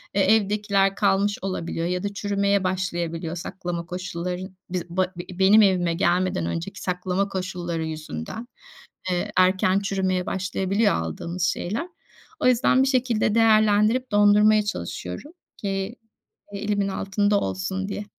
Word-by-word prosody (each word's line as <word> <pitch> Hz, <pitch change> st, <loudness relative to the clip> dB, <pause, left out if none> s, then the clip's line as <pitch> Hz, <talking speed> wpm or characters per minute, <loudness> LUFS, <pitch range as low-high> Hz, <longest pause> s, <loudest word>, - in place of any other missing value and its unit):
eee, 200 Hz, -, +3 dB
evdekiler 200 Hz, -2 st, +1 dB
kalmış 200 Hz, 0 st, +2 dB
olabiliyor 170 Hz, -3 st, -3 dB
ya 180 Hz, +1 st, -2 dB
da 205 Hz, 0 st, -3 dB
çürümeye 200 Hz, -1 st, 0 dB
başlayabiliyor. 175 Hz, -3 st, -2 dB
Saklama 175 Hz, -1 st, -5 dB
koşulları 180 Hz, 0 st, -4 dB
n -, -, -10 dB, 0.2 s
biz 180 Hz, -1 st, -4 dB
ba 185 Hz, +1 st, -1 dB
b 180 Hz, +1 st, -8 dB
benim 200 Hz, +3 st, +7 dB
evime 180 Hz, -4 st, +3 dB
gelmeden 175 Hz, -, +1 dB
önceki 85 Hz, 0 st, -4 dB
saklama 185 Hz, +2 st, -1 dB
koşulları 180 Hz, -3 st, -3 dB
yüzünden, 155 Hz, -, -6 dB, 0.6 s
eee, 175 Hz, -, -1 dB
erken 185 Hz, +1 st, +4 dB
çürümeye 190 Hz, -2 st, -1 dB
başlayabiliyor 195 Hz, +3 st, 0 dB
aldığımız 170 Hz, -, -4 dB
şeyler. 200 Hz, -, -1 dB, 0.5 s
O -, -, +2 dB
yüzden 255 Hz, +1 st, +4 dB
bir 270 Hz, -, +1 dB
şekilde 245 Hz, -5 st, +1 dB
değerlendirip 220 Hz, +2 st, +4 dB
dondurmaya 210 Hz, +1 st, +5 dB
çalışıyorum 90 Hz, -, -5 dB, 0.3 s
ki 195 Hz, +2 st, -3 dB, 0.6 s
elimin 205 Hz, 0 st, -1 dB
altında 200 Hz, +1 st, +1 dB
olsun 190 Hz, +1 st, -3 dB
diye. 205 Hz, 0 st, -4 dB
190 Hz, 130 wpm, -24 LUFS, 180-205 Hz, 0.6 s, benim